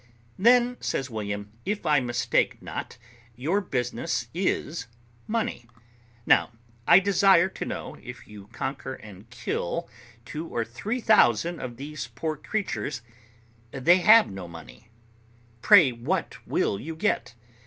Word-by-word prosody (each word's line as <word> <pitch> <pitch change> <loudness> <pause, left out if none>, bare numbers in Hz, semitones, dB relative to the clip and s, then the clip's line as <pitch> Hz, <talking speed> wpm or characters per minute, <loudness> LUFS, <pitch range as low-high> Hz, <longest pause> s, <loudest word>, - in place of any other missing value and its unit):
"Then," 245 +3 +4
says 130 -1 -2
William, 105 -1 -4
"if 205 -1 -3
I 150 -2 +4
mistake 120 -2 0
not, - - -7 0.4
your 160 - 0
business 120 - -2
is 170 -4 -2 0.4
money; 215 - -2 0.6
now, - - +4 0.4
I - - +9
desire 195 -2 +5
to - - -6
know, - - -6
if 125 +1 -10
you 105 -2 -12
conquer - - -5
and 105 +1 -13
kill 120 - -3 0.4
two 155 +5 -6
or 115 -6 -2
three 200 - -4
thousand 170 - +4
of 120 -2 -6
these 145 0 -6
poor 155 +7 -4
creatures, 140 - -3 0.7
they 145 +9 +4
have 215 - +6
no 95 -2 -7
money, 85 +7 -13 0.7
pray 175 - +7
what 120 0 -2
will 100 - 0
you 160 +7 -6
get? 160 - -1
135 Hz, 130 wpm, -26 LUFS, 115-185 Hz, 0.7 s, I